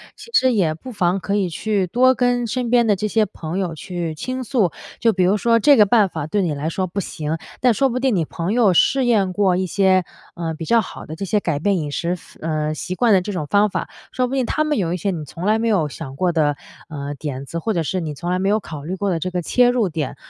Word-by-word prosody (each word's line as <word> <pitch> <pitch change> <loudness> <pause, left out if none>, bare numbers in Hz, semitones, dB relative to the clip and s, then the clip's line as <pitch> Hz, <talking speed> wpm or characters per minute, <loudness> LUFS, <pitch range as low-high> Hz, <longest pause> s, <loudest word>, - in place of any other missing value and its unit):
其 - - -13
实 260 - +4
也 180 -8 +2
不 210 +11 -10
妨 185 -3 +1
可 200 +2 -2
以 195 -3 +1
去 200 +2 -1
多 255 +7 +4
跟 245 -1 +1
身 245 +1 -2
边 240 -1 +4
的 210 - +4
这 210 +3 -2
些 215 +1 +2
朋 170 -3 -6
友 180 -4 -2
去 170 0 -4
倾 255 +10 -4
诉。 220 - +1 0.3
就 230 - +3
比 185 - +1
如 185 +3 +3
说 230 +2 +3
这 285 +6 +6
个 210 - +6
办 210 0 +4
法 160 -4 -5
对 205 +6 0
你 170 -5 0
来 145 +2 -3
说 185 +2 -2
不 185 +3 -4
行， 160 -3 -3 0.2
但 250 -2 +4
说 270 +5 +2
不 250 +1 -2
定 255 -4 +1
你 170 - +1
朋 170 +6 -3
友 225 -6 +4
试 265 +9 +3
验 205 -6 +2
过 190 -2 +2
一 185 - 0
些， 185 0 +2 0.3
呃， 165 -2 -3
比 160 - -7
较 230 +7 +4
好 - - -9
的 155 - -7
这 195 - -4
些 210 +3 +1
改 165 -7 -2
变 195 +4 +1
饮 150 -4 -3
食， 175 +4 -2 0.2
呃， 155 -1 -1
习 180 +4 -5
惯 235 +1 +3
的 190 - +5
这 205 +3 -5
种 160 -5 -3
方 205 +6 +3
法， - - -4 0.2
说 255 -1 0
不 265 - -3
定 260 -2 +1
他 305 - 0
们 305 -2 0
有 175 -4 0
一 - - -1
些 195 +3 -1
你 160 -4 -5
从 165 +5 -7
来 215 +2 +3
没 230 - 0
有 190 -9 +2
想 140 -2 -8
过 180 +4 +1
的， 150 -3 +1 0.3
呃， 145 -2 -5
点 140 -2 -5
子， 170 +4 -5
或 220 +6 -1
者 170 -4 0
是 185 +4 -2
你 155 -2 -4
从 170 +5 -5
来 180 - 0
没 195 +1 +1
有 215 +1 +3
考 155 -8 -8
虑 175 +5 -4
过 200 +1 -1
的 170 -3 0
这 185 +3 -3
个 180 0 -1
切 245 +8 +3
入 240 -6 +1
点。 155 -4 -3
185 Hz, 300 characters per minute, -21 LUFS, 165-225 Hz, 0.3 s, 这